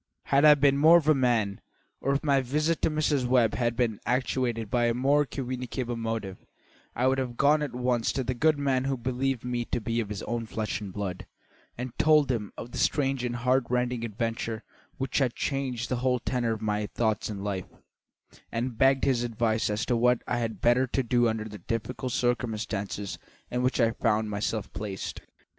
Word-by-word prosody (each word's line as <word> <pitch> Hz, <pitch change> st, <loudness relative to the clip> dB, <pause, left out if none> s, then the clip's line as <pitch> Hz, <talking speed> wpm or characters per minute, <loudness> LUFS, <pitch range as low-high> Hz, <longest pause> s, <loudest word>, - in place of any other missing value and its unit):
Had 140 Hz, +2 st, +3 dB
I 150 Hz, -1 st, +9 dB
been 140 Hz, -1 st, +3 dB
more 160 Hz, +3 st, +8 dB
of 155 Hz, -3 st, -1 dB
a 155 Hz, -, +7 dB
man, 120 Hz, -7 st, +1 dB, 0.4 s
or 140 Hz, -, 0 dB
if 140 Hz, -, -1 dB
my 140 Hz, -3 st, +3 dB
visit 150 Hz, +6 st, 0 dB
to -, -, +3 dB
Mrs. 150 Hz, -4 st, +1 dB
Webb 120 Hz, -3 st, +3 dB
had 120 Hz, -1 st, 0 dB
been 115 Hz, -4 st, 0 dB
actuated 125 Hz, -3 st, -1 dB
by 120 Hz, -1 st, +2 dB
a 120 Hz, 0 st, +1 dB
more 140 Hz, +4 st, +3 dB
communicable 125 Hz, -2 st, -4 dB
motive, 115 Hz, -4 st, -4 dB, 0.5 s
I 125 Hz, -, +1 dB
would 130 Hz, 0 st, +3 dB
have 125 Hz, -2 st, -3 dB
gone 150 Hz, +2 st, +4 dB
at 140 Hz, -5 st, -3 dB
once 125 Hz, -2 st, +1 dB
to 135 Hz, -, -1 dB
the 130 Hz, -, -1 dB
good 155 Hz, +4 st, +2 dB
man 135 Hz, -2 st, +1 dB
who 135 Hz, -1 st, 0 dB
believed 130 Hz, +1 st, -2 dB
me 120 Hz, -1 st, -1 dB
to 120 Hz, -, -2 dB
be 115 Hz, +1 st, -2 dB
of 110 Hz, -3 st, -2 dB
his 105 Hz, -1 st, -5 dB
own 115 Hz, -1 st, -3 dB
flesh 110 Hz, -1 st, -3 dB
and 100 Hz, -2 st, -6 dB
blood, 95 Hz, -2 st, -5 dB, 0.5 s
and 125 Hz, 0 st, -5 dB
told 150 Hz, -3 st, +5 dB
him 105 Hz, -5 st, -3 dB
of 120 Hz, -, -7 dB
the -, -, -5 dB
strange 135 Hz, -3 st, +1 dB
and 120 Hz, -1 st, -2 dB
heart 125 Hz, +1 st, +2 dB
rending 125 Hz, -1 st, 0 dB
adventure 115 Hz, 0 st, -3 dB, 0.3 s
which 135 Hz, +1 st, -1 dB
had 130 Hz, -4 st, +1 dB
changed 130 Hz, -3 st, -2 dB
the 125 Hz, -, -1 dB
whole 125 Hz, +1 st, +1 dB
tenor 120 Hz, -1 st, -1 dB
of 110 Hz, -, -6 dB
my 105 Hz, -1 st, -1 dB
thoughts 110 Hz, -1 st, -1 dB
and 100 Hz, -2 st, -5 dB
life, 95 Hz, -3 st, -3 dB, 0.8 s
and 115 Hz, 0 st, -3 dB
begged 135 Hz, 0 st, +4 dB
his 130 Hz, -3 st, +2 dB
advice 115 Hz, -2 st, 0 dB
as 105 Hz, +2 st, -1 dB
to 125 Hz, -, +1 dB
what 125 Hz, +1 st, +3 dB
I 120 Hz, -, 0 dB
had 115 Hz, -2 st, -3 dB
better 125 Hz, +2 st, +4 dB
do 120 Hz, -2 st, +2 dB
under 110 Hz, -1 st, -2 dB
the 105 Hz, -1 st, -9 dB
difficult 125 Hz, +3 st, -3 dB
circumstances 110 Hz, -5 st, -2 dB, 0.3 s
in 125 Hz, -, 0 dB
which 130 Hz, +1 st, +1 dB
I 115 Hz, -2 st, +4 dB
found 110 Hz, -2 st, 0 dB
myself 105 Hz, 0 st, -2 dB
placed. 100 Hz, -1 st, -5 dB
120 Hz, 200 wpm, -28 LUFS, 115-130 Hz, 0.8 s, I